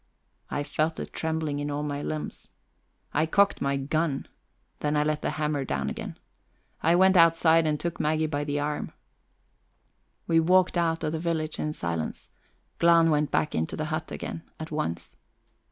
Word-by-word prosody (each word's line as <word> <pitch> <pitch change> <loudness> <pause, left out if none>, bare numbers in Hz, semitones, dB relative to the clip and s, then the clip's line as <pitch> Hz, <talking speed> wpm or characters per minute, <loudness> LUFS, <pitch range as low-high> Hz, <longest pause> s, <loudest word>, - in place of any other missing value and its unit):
I 145 - -2
felt 155 +2 -1
a - - -3
trembling 160 -3 -2
in 145 0 -2
all 145 +1 -2
my 145 -1 -3
limbs. 155 0 -5 0.7
I 155 +2 +2
cocked 200 +4 +3
my 140 0 +1
gun; 145 +1 -1 0.5
then 150 0 0
I 150 - +3
let 150 0 -1
the - - -1
hammer 150 -2 0
down - - -2
again. - - -6 0.6
I 165 +2 +4
went 190 +1 +5
outside 165 -1 +5
and 150 -1 0
took 170 -1 -3
Maggie 155 +1 +1
by 145 -1 -1
the 145 0 -1
arm; 150 +1 -3 1.3
we 165 -1 +3
walked 180 +3 +4
out 165 -1 +1
of 155 - 0
the 160 - -2
village 160 -2 -2
in 150 - -1
silence; 85 - -4 0.5
Glahn 170 -1 +5
went 150 -1 +2
back 150 - 0
into 80 0 -1
the 155 - -2
hut 160 +1 -3
again 165 - -5 0.2
at 160 0 -6
once. 85 - -3
155 Hz, 170 wpm, -27 LUFS, 145-165 Hz, 1.3 s, went